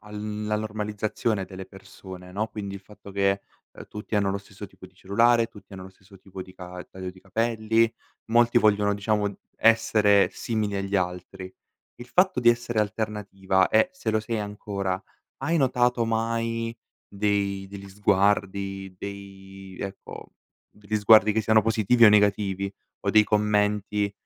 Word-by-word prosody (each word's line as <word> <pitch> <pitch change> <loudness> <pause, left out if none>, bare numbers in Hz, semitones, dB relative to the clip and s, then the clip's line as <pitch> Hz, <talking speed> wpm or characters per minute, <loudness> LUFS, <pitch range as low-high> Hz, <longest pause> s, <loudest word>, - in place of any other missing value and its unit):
alla 105 0 -4
normalizzazione 105 -1 -2
delle 95 0 -9
persone, 95 -1 -12
no, 110 +3 -2
quindi 100 -2 -6
il 100 - -8
fatto 100 0 -14
che, 100 0 +1 0.3
ehm, - - -12
tutti 105 +1 -5
hanno 100 -1 +1
lo 100 - -2
stesso 100 +1 -11
tipo 95 - -17
di 95 - -24
cellulare, 115 +5 +3
tutti 105 -3 -17
hanno 95 -1 -8
lo 95 - -11
stesso 95 +1 -19
tipo 95 -1 -9
di 95 - -14
ca 90 0 -9
taglio 95 -1 -6
di 95 0 -17
capelli. 115 +2 +1 0.4
Molti 120 0 +5
vogliono, 105 -2 +3
diciamo, 105 0 0 0.2
essere 110 -3 +4
simili 110 -3 -2
agli 100 0 -1
altri. 90 0 -4 0.5
Il 120 - -11
fatto 180 +1 +2
di 120 - +4
essere 120 -1 +2
alternativa 100 -3 -1
è 110 +9 +3
se 120 -12 -3
lo 110 - +2
sei 110 0 -3
ancora, 100 -2 -3 0.4
hai 165 +2 -1
notato 125 -3 +2
mai 115 0 -2 0.3
dei 100 -1 -1
degli 100 0 -10
sguardi, 100 -1 0
dei 95 -1 -10
ecco, 100 0 -8 0.4
degli 105 +1 -3
sguardi 105 0 +6
che 110 - +1
siano 110 0 +4
positivi 115 +1 +3
o 105 - +10
negativi, 100 -2 +2 0.3
o - - +3
dei 110 0 +6
commenti 105 -1 +1
105 Hz, 155 wpm, -25 LUFS, 95-110 Hz, 0.5 s, o